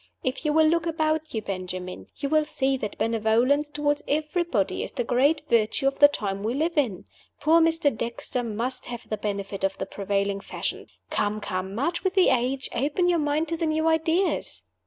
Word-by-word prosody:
If 260 +3 -2
you 300 - +3
will 315 +1 +5
look 335 +1 +2
about 315 -1 0
you, 220 - -2
Benjamin, 185 -1 -5
you 280 - -3
will 310 +1 +3
see 270 -2 0
that 210 -5 -5
benevolence 230 +6 +2
toward 295 0 0
everybody 305 - 0
is - - -5
the 245 - -1
great 280 +6 +2
virtue 230 +2 +2
of 275 0 +1
the 290 - +10
time 200 -8 -3
we 225 +4 -1
live 325 +4 0
in. 240 - 0 0.3
Poor 325 +2 +5
Mr. 325 -5 +2
Dexter 235 +2 -3
must 240 +3 -2
have 240 -2 -7
the 215 - -2
benefit 200 -1 -4
of 195 0 0
the - - -3
prevailing 200 0 -1
fashion. 195 - -5 0.2
Come, 210 +1 0
come, 190 -1 -4
march 335 - -1
with 380 0 0
the 375 - +5
age! 255 +1 0
Open 295 +8 +1
your 345 -1 +3
mind 300 +2 0
to 330 - -1
the 325 -1 0
new 315 +1 +1
ideas!" 325 +3 +1
270 Hz, 195 wpm, -26 LUFS, 215-310 Hz, 0.3 s, the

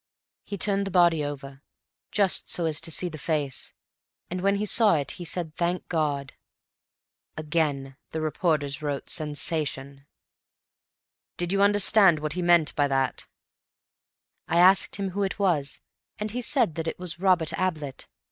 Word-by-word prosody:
"He 200 - -6
turned 200 +1 +1
the - - -3
body 170 -4 +3
over, 140 -1 -7 0.5
just 200 -3 +1
so 170 - +1
as 155 -2 0
to - - -1
see 180 +4 +2
the 155 -3 -8
face, 145 -3 -2 0.6
and 180 0 -3
when 200 +1 +2
he 205 +1 -1
saw 210 -3 +4
it, 140 -3 -2
he 175 - -8
said, 165 -2 -4
'Thank 175 +1 -2
God.'" 145 -5 -1 1.0
Again 150 -4 -1
the 160 - -4
reporters 155 -3 -1
wrote 145 -2 -3
"Sensation." 145 -3 -4 1.3
"Did 175 0 0
you 195 0 +1
understand 200 -3 +5
what 150 0 -3
he 180 - -3
meant 175 -3 +3
by 145 -1 +2
that?" 135 -3 -1 1.2
"I - - 0
asked 185 +2 +5
him 195 -2 -3
who 200 +3 -3
it 195 -1 -1
was, 170 -9 0 0.4
and 210 0 -4
he 250 +3 -3
said 240 - +1
that 165 - -7
it - - -3
was 180 -2 -4
Robert 180 -4 +2
Ablett. 155 -8 -3
165 Hz, 155 wpm, -26 LUFS, 145-185 Hz, 1.3 s, understand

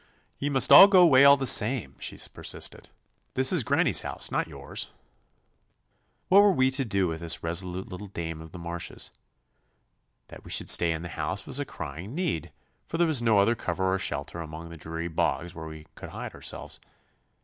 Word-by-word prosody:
'Ye 145 - -2
must 130 -3 +4
go 185 +4 +9
'way 140 -5 +6
all 140 0 +7
the 135 - -3
same,' 110 - +3
she - - -4 0.2
persisted; - - -4 0.5
'this 130 +5 +4
is 165 -8 +3
granny's - - +3
house, - - -2
not - - -1
yours.' - - -6 1.4
What 195 +2 +6
were 205 0 +5
we 130 -4 +2
to 135 +1 0
do 100 -5 0
with 80 -1 -4
this 85 -1 0
resolute 90 +2 -2
little 95 +2 -9
dame 80 -4 -6
of 80 0 -12
the - - -10
marshes? 85 0 -6 1.2
That - - -13
we - - -13
should - - -2
stay 85 -1 +3
in 80 +1 -4
the 85 - -7
house 85 +4 -4
was 145 - -7
a 145 - -2
crying 85 - -8
need, 170 - -3 0.4
for 165 - -4
there 170 - +3
was 155 -7 0
no 115 -3 +3
other 100 +4 +3
cover 95 -3 -2
or 95 - -1
shelter 85 - -3
among 80 +1 -8
the 85 - -10
dreary 80 +1 -6
bogs 85 0 -2
where 80 -1 -8
we 80 -1 -11
could - - -10
hide - - -8
ourselves. - - -6
95 Hz, 195 wpm, -26 LUFS, 85-130 Hz, 1.4 s, go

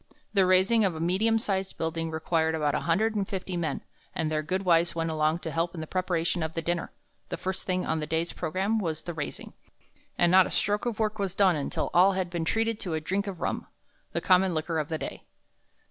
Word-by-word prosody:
The 195 -3 +4
raising 190 +5 +4
of 185 -4 +1
a - - -5
medium 190 +7 +2
sized 195 -3 -2
building 165 0 -2
required 160 0 0
about 150 -2 +1
one - - 0
hundred 210 +7 +2
and 200 -2 -1
fifty 190 -1 -3
men, 170 -2 -2 0.3
and 155 -1 -1
their 155 0 +1
good 185 +5 -2
wives 170 -1 +3
went 165 -1 -1
along 155 +1 +1
to 160 - -4
help 170 +2 -1
in - - -5
the 160 - -4
preparation 175 0 0
of 160 0 -2
the 165 - -1
dinner. 170 +1 -1 0.4
The - - -3
first 190 0 -4
thing 185 -1 0
on 160 - 0
the 150 - -3
day's 165 +2 -1
program 190 +7 0
was 160 -5 -3
the 175 - -5
raising, 150 -2 -6 0.6
and 175 -1 +4
not 185 0 +7
a - - -6
stroke 205 +3 0
of 230 -3 -2
work 215 -1 -1
was 195 -2 -2
done 190 -4 +4
until 145 - -2
all 185 +3 +6
had 185 -2 -2
been 170 -2 -2
treated 225 +4 0
to 180 -7 -3
a - - 0
drink 195 +6 -2
of 190 -4 -6
rum, - - -2 0.4
the - - -2
common 185 -1 +4
liquor 160 +1 -1
of 150 - -3
the 160 - -1
day. - - -6
175 Hz, 235 wpm, -28 LUFS, 160-195 Hz, 0.6 s, not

